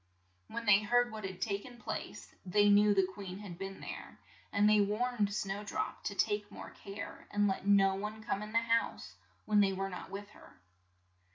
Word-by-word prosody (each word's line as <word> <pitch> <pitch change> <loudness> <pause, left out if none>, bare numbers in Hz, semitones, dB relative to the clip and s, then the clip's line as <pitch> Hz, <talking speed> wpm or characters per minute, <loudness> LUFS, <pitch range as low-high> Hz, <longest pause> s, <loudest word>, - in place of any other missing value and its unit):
When 235 - -5
they 210 -1 +6
heard 245 +3 +2
what 215 -2 -6
had 190 -1 -6
ta 200 -2 -1
ken 245 +1 -12
place, - - -6
they 205 +2 +4
knew 205 +1 +6
the 195 -1 +4
queen 190 0 -7
had 195 -4 -9
been 195 0 -6
there, - - -8 0.3
and 205 +1 +4
they 210 0 +6
warned 210 +1 +1
Snow 200 0 -2
drop 205 - -3
to 200 - -2
take 205 +1 0
more - - -9
care, 200 +1 -8
and 205 0 +2
let 195 0 -2
no 195 -1 +5
one 210 +3 -5
come 200 - -1
in 210 0 -6
the 230 - +2
house 230 0 0 0.3
when 210 -1 +3
they 195 -1 +4
were 195 +1 -2
not 180 - -7
with 200 +1 -7
her. 210 - -17
205 Hz, 200 wpm, -33 LUFS, 195-210 Hz, 0.3 s, they